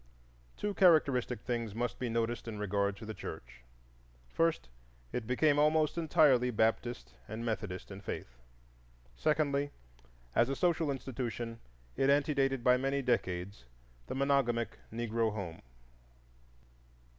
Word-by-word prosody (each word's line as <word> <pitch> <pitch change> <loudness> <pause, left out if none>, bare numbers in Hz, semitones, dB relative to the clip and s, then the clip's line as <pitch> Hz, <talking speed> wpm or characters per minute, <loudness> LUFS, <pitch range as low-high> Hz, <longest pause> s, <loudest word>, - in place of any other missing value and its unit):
Two 210 0 -2
characteristic 145 -10 +4
things 115 -4 -3
must 120 +1 -2
be 125 - -2
noticed 115 +1 -1
in 110 -2 -5
regard 100 -1 0
to 110 - -9
the 110 - -5
church. 60 -9 -8 0.7
First, 165 - 0 0.5
it 115 -3 -3
became 145 +3 +3
almost 155 0 +3
entirely 150 -7 +4
Baptist 110 - 0
and 115 +2 -5
Methodist 105 -5 -4
in 95 0 -8
faith; - - -6 0.8
secondly, 145 - +1 0.6
as 120 +2 +3
a 135 - 0
social 165 -1 +1
institution 120 -4 -4 0.4
it 135 - +2
antedated 140 -3 +2
by 125 0 +5
many 135 +1 0
decades 95 - -1 0.4
the - - -4
monogamic 130 -5 +1
Negro 115 -1 0
home. 95 -6 -6
120 Hz, 120 wpm, -32 LUFS, 110-140 Hz, 0.8 s, by